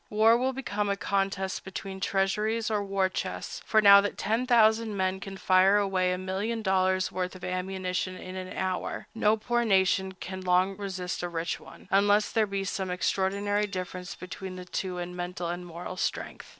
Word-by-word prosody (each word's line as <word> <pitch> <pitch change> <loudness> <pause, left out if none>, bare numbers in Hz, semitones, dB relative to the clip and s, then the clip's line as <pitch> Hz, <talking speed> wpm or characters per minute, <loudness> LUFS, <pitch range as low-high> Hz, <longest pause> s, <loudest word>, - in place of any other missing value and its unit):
War 220 +2 +5
will 255 +2 +1
become 210 -6 -2
a 200 - 0
contest 195 -1 -1
between 190 0 -6
treasuries 210 +4 0
or 210 -1 +1
war 195 -1 +1
chests; 185 - -5
for 215 -1 +4
now 200 0 +9
that 205 - -3
10,000 225 -1 +3
men 190 0 0
can 195 0 -7
fire 190 +2 +5
away 190 -3 +1
a 180 - -1
million 200 +5 -3
dollars' 185 -1 +2
worth 185 0 -3
of 185 - -12
ammunition 185 0 -2
in 185 0 -8
an 185 0 -6
hour, 185 -1 -2
no 220 -1 +3
poor 240 +2 0
nation 190 -2 +2
can 190 0 -7
long 185 +1 +2
resist 185 -3 -4
a 175 - -3
rich 170 0 -3
one, - - -14
unless 205 +1 +4
there 220 -2 +2
be 195 0 -2
some 190 0 -3
extraordinary 200 +3 0
difference 185 -2 -5
between 185 0 -7
the 180 0 -8
two 180 0 -3
in 175 0 -5
mental 175 -1 -4
and 175 +1 -5
moral 175 +2 -7
strength. - - -3
190 Hz, 180 wpm, -28 LUFS, 185-205 Hz, -, now